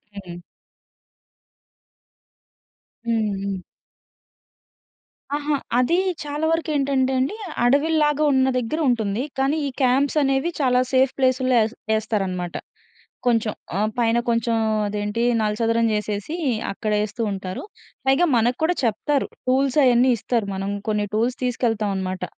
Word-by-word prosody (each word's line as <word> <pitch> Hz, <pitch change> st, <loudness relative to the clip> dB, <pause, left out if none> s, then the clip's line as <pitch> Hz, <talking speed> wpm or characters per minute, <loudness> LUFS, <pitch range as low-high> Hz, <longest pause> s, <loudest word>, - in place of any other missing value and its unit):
హ్మ్. 180 Hz, -3 st, -8 dB, 2.7 s
హ్మ్. 220 Hz, -3 st, 0 dB
హ్మ్. 195 Hz, -1 st, -2 dB, 1.8 s
ఆహా! 295 Hz, 0 st, 0 dB, 0.2 s
అది 255 Hz, +8 st, +3 dB, 0.3 s
చాలా 295 Hz, +2 st, -3 dB
వరకేంటంటే 280 Hz, -5 st, +1 dB
అండి, 270 Hz, +11 st, 0 dB, 0.3 s
అడవిల్లాగా 295 Hz, +3 st, +3 dB
ఉన్న 265 Hz, 0 st, +3 dB
దగ్గర 250 Hz, +7 st, -2 dB
ఉంటుంది. 225 Hz, 0 st, 0 dB
కానీ 275 Hz, +4 st, +1 dB
ఈ -, -, -2 dB
క్యాంప్స్ 265 Hz, +4 st, +2 dB
అనేవి 270 Hz, +4 st, +1 dB
చాలా 250 Hz, -2 st, +3 dB
సేఫ్ 260 Hz, 0 st, +3 dB
ప్లేసులో 255 Hz, 0 st, +2 dB
యేస్ 220 Hz, +1 st, +1 dB, 0.2 s
యేస్తారనమాట. 195 Hz, -5 st, -2 dB, 0.7 s
కొంచెం 230 Hz, -3 st, +2 dB, 0.2 s
ఆహ్, 210 Hz, +2 st, +1 dB
పైన 235 Hz, -1 st, +2 dB
కొంచెం 230 Hz, 0 st, +1 dB, 0.3 s
అదేంటి 205 Hz, +2 st, -2 dB, 0.2 s
నలచదరం 230 Hz, +2 st, +1 dB
జేసేసి 210 Hz, -, -2 dB, 0.4 s
అక్కడేస్తూంటారు. 210 Hz, -2 st, -2 dB, 0.4 s
పైగా 270 Hz, +6 st, +4 dB
మనకు 240 Hz, +2 st, +1 dB
కూడా 355 Hz, +2 st, +2 dB
చెప్తారు 255 Hz, +5 st, 0 dB, 0.2 s
టూల్స్ 265 Hz, +2 st, +2 dB
అయన్నీ 250 Hz, 0 st, +5 dB
ఇస్తారు. 225 Hz, 0 st, -1 dB
మనం 195 Hz, +1 st, -3 dB, 0.2 s
కొన్ని 210 Hz, -1 st, 0 dB
టూల్స్ 235 Hz, +4 st, 0 dB
తీసుకెళ్తాం 225 Hz, -4 st, 0 dB
అనమాట. 185 Hz, -1 st, -3 dB
240 Hz, 110 wpm, -22 LUFS, 210-270 Hz, 2.7 s, అయన్నీ